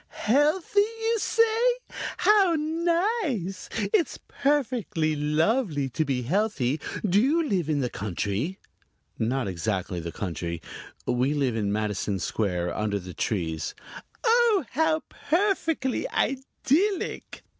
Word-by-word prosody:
"Healthy, 300 - +3
you 450 +2 +1
say? 450 +1 +2 0.6
How 395 -5 +5
nice. 325 - -1 0.2
It's 385 -7 +2
perfectly 245 - 0
lovely 150 - +1
to 145 +6 0
be 135 -4 -1
healthy. 155 - 0 0.3
Do 200 +2 +4
you 310 +6 +2
live 180 - 0
in 145 -2 +1
the 125 - 0
country?" 105 - -2 0.6
"Not 125 +1 0
exactly 95 -1 -2
the 85 0 -5
country. 85 -4 -4 0.5
We 130 +4 +1
live 135 -5 +1
in 105 -3 0
Madison 105 -1 -1
Square, 90 -2 -1
under 105 -1 0
the 90 -2 -8
trees." 80 -7 -2 0.5
"Oh, 460 - +4
how 315 +1 +1
perfectly 325 - 0
idyllic!" 290 +8 -1
185 Hz, 115 wpm, -26 LUFS, -, 0.6 s, How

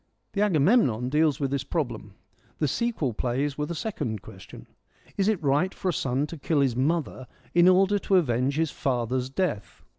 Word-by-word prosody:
The 200 - 0
Agamemnon 155 - +3
deals 150 -1 +2
with 140 -2 -1
this 140 -1 -1
problem; 120 - -4 0.4
the 150 - 0
sequel 160 - -1
plays 130 +5 -1
with 150 +1 -3
a 170 - -3
second 120 - -4
question, - - -12 0.3
' - - -29
Is 195 - +1
it 215 -4 +2
right 145 +7 +2
for 190 - -2
a - - 0
son 135 0 -1
to 165 +2 -8
kill 145 +1 +1
his 130 -4 +1
mother 140 -1 -1 0.3
in 175 +1 +5
order 190 +2 +4
to 195 - +1
avenge 130 -5 +2
his 160 -1 0
father's 125 0 -1
death 135 - -3
145 Hz, 185 wpm, -26 LUFS, 130-175 Hz, 0.4 s, in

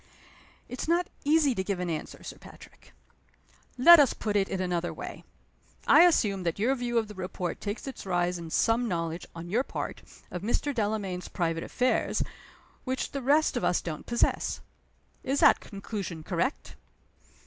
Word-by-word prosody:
"It's 250 +4 -5
not 345 +2 +1
easy 295 -2 +4
to 190 - -2
give 195 -1 -2
an 180 - -2
answer, 160 -3 -5
Sir - - -8
Patrick." - - -15 0.9
"Let 340 +7 +9
us 280 -4 +4
put 210 -2 -3
it 195 -1 +2
in 190 - -2
another 175 -2 -1
way. - - -8 0.6
I 345 - +8
assume 210 - +2
that 170 -2 -2
your 230 +6 +2
view 240 -2 -2
of 225 -2 +1
the 210 - -9
report 185 -2 -4
takes 205 +2 -4
its 270 - -7
rise 175 -1 0
in 165 -1 -7
some 230 +7 +2
knowledge, 165 -3 -3
on 170 +1 -7
your 235 +5 +3
part, - - -5 0.3
of 180 - -5
Mr. 240 +7 -1
Delamayn's 205 -5 -2
private 165 -2 -2
affairs, 255 0 0 0.6
which 260 0 -2
the 275 - -4
rest 290 +3 +3
of 245 - -1
us 180 - +2
don't 155 -3 -6
possess. 235 0 0 0.6
Is 275 +2 0
that - - +6
conclusion 195 -5 -6
correct?" 185 - -2
205 Hz, 170 wpm, -28 LUFS, 180-255 Hz, 0.9 s, Let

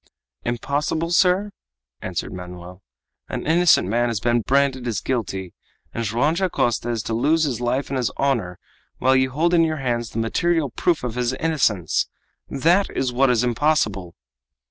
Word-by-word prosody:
"Impossible, 145 +7 -2
sir?" 185 +3 +3 0.5
answered 90 -1 -4
Manoel. 90 0 -9 0.5
"An - - -4
innocent 165 - +4
man 120 +4 +1
has 115 -3 -1
been 120 +2 +1
branded 135 0 +1
as 110 -4 -1
guilty, 95 -8 -3 0.4
and 115 - -3
Joam 120 +8 +1
Dacosta 165 - 0
is 115 -3 -2
to 115 - -3
lose 150 +8 +2
his 130 -6 -1
life 125 +3 -1
and 135 - -1
his 125 -3 0
honor 115 -11 0 0.4
while 130 +1 +3
you 130 0 +3
hold 165 +6 0
in 170 -1 +5
your 160 -1 0
hands 120 -4 -2
the - - -8
material 155 +6 0
proof 165 +5 0
of 120 -2 -3
his 125 +1 -1
innocence! 130 - 0 0.4
That 170 +8 +2
is 130 -2 0
what 135 +2 +3
is 120 -1 +2
impossible!" 120 - 0
125 Hz, 165 wpm, -22 LUFS, 115-155 Hz, 0.5 s, in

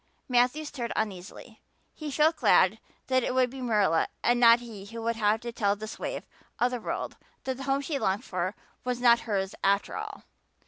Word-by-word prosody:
Matthew 250 +5 +2
stirred 245 -5 -5
uneasily. 195 -3 -5 0.3
He 310 -1 -6
felt 310 +3 +3
glad - - +4 0.3
that 260 -1 +2
it 250 - -2
would 255 -1 +3
be 265 0 -8
Marilla 210 -9 +2 0.2
and 240 0 +3
not 235 0 +7
he 220 -5 -9
who 230 +2 -7
would 230 0 0
have 215 0 +2
to 235 - -5
tell 205 -3 +1
this 215 +1 -8
waif - - -4 0.3
of 245 +1 +2
the 245 -2 -3
world - - -4 0.3
that 260 -1 -3
the 270 - -6
home 275 +1 +1
she 280 0 -2
longed 200 +4 0
for 185 +2 -2 0.3
was 250 -1 -2
not 235 -1 +6
to - - -11
be - - -13
hers 195 -3 -1
after 200 +1 +2
all. - - -6
235 Hz, 210 wpm, -28 LUFS, 205-255 Hz, 0.3 s, not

